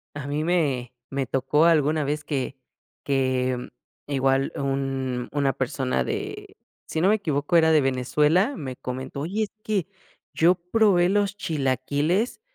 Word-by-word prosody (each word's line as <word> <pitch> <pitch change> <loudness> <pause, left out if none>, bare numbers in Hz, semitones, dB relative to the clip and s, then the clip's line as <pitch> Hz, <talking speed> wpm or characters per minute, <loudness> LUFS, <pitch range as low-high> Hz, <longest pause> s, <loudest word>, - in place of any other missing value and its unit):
A 140 -1 -5
mí 150 +2 -1
me 140 -8 0 0.2
me 135 -1 -1
tocó 135 +4 +2
alguna 155 -2 +3
vez 150 +2 -2
que 140 -3 -3 0.5
que, 130 -2 0 0.4
igual, 135 -1 +1
un 135 -2 -2
una 140 -2 +1
persona 130 - -1
de, - - -5 0.3
si 160 - -2
no 190 - +4
me 215 - +5
equivoco, 155 -5 -1
era 160 -1 +5
de 155 -2 +5
Venezuela, 150 - +2
me 130 -3 -5
comentó: 130 +2 -6
"Oye, 200 +8 -1
es 210 - -5
que 200 -4 -1 0.5
yo 175 +3 +4
probé 180 0 +3
los 205 0 +1
chilaquiles 150 - 0
145 Hz, 145 wpm, -25 LUFS, 135-170 Hz, 0.5 s, me